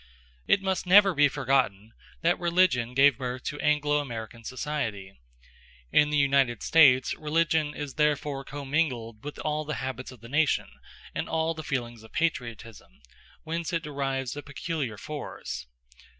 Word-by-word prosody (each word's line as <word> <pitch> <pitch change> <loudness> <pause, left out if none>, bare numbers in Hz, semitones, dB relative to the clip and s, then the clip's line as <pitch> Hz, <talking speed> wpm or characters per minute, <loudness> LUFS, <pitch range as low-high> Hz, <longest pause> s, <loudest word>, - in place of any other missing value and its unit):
It 195 - +3
must 190 -1 -1
never 195 +1 +7
be 145 -2 +5
forgotten 130 -7 0 0.3
that 170 +2 +2
religion 170 -9 +2
gave 135 -1 +5
birth 125 0 -4
to 145 - -4
Anglo 150 0 +2
American 115 -4 -6
society. 115 -7 -4 0.8
In 150 - +4
the 150 - +1
United 135 -5 +2
States 130 -6 +5
religion 155 -1 0
is 145 -2 -5
therefore 150 -2 0
commingled 135 -6 -2
with 145 +1 -7
all 155 0 -2
the 150 -1 -4
habits 130 -1 -5
of 125 -4 -14
the 115 - -11
nation 150 +3 +1 0.4
and - - -3
all 160 0 0
the 160 - -7
feelings 120 -5 -3
of 110 - -16
patriotism; 115 - -3 0.4
whence 165 +1 -3
it 165 -1 0
derives 135 -3 -3
a 145 - -5
peculiar 145 -5 -4
force. 145 - -6
145 Hz, 150 wpm, -27 LUFS, 125-155 Hz, 0.8 s, never